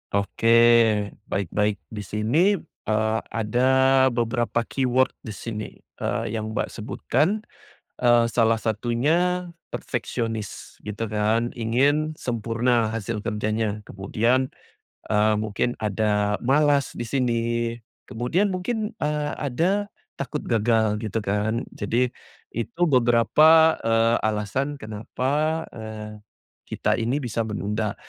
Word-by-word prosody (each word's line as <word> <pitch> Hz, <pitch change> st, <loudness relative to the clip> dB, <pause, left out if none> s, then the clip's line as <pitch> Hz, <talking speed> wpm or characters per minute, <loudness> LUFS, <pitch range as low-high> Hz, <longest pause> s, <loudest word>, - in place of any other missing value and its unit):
Oke, 100 Hz, +3 st, -1 dB, 0.8 s
baik 100 Hz, -4 st, -2 dB
baik. 105 Hz, -4 st, 0 dB
Di 105 Hz, -, -6 dB
sini, 115 Hz, -, +2 dB, 0.3 s
eee, 110 Hz, +1 st, +1 dB
ada 120 Hz, +4 st, +1 dB, 0.4 s
beberapa 120 Hz, -1 st, 0 dB
keyword 130 Hz, +1 st, +1 dB
di 110 Hz, -3 st, -8 dB
sini, 105 Hz, -1 st, -5 dB, 0.3 s
eee, 115 Hz, -2 st, -2 dB
yang 110 Hz, -1 st, -4 dB
Mbak -, -, -1 dB
sebutkan. 195 Hz, -, -1 dB, 0.5 s
Eee, 120 Hz, -1 st, +4 dB
salah 115 Hz, -1 st, +2 dB
satunya 150 Hz, -, 0 dB, 0.2 s
perfeksionis 115 Hz, -4 st, -4 dB
gitu 105 Hz, +1 st, -4 dB
kan, 110 Hz, +3 st, +1 dB
ingin 140 Hz, +7 st, +1 dB
sempurna 115 Hz, -3 st, 0 dB
hasil 115 Hz, 0 st, -3 dB
kerjanya. 105 Hz, 0 st, -1 dB
Kemudian, 115 Hz, +7 st, 0 dB, 0.6 s
eee, 110 Hz, 0 st, +3 dB
mungkin 110 Hz, +3 st, -1 dB
ada 105 Hz, -1 st, +1 dB
malas 140 Hz, +1 st, +3 dB
di 120 Hz, -, -5 dB
sini, 125 Hz, -4 st, +1 dB, 0.6 s
kemudian 175 Hz, -, 0 dB
mungkin, 215 Hz, +4 st, -2 dB
eee, 150 Hz, 0 st, -1 dB
ada 175 Hz, +9 st, 0 dB, 0.3 s
takut 135 Hz, -, -3 dB
gagal, 110 Hz, -2 st, +1 dB
gitu 110 Hz, -2 st, -5 dB
kan. 105 Hz, +4 st, 0 dB
Jadi, 120 Hz, +4 st, 0 dB, 0.4 s
itu 115 Hz, +8 st, -5 dB
beberapa, 155 Hz, +5 st, +5 dB
eee, 115 Hz, +1 st, +3 dB
alasan 110 Hz, +7 st, -1 dB
kenapa, 140 Hz, +8 st, -2 dB
eee, 110 Hz, -1 st, -8 dB, 0.5 s
kita -, -, 0 dB
ini 125 Hz, +6 st, -1 dB
bisa 115 Hz, -2 st, -2 dB
menunda. 105 Hz, 0 st, -2 dB
115 Hz, 110 wpm, -24 LUFS, 110-130 Hz, 0.8 s, beberapa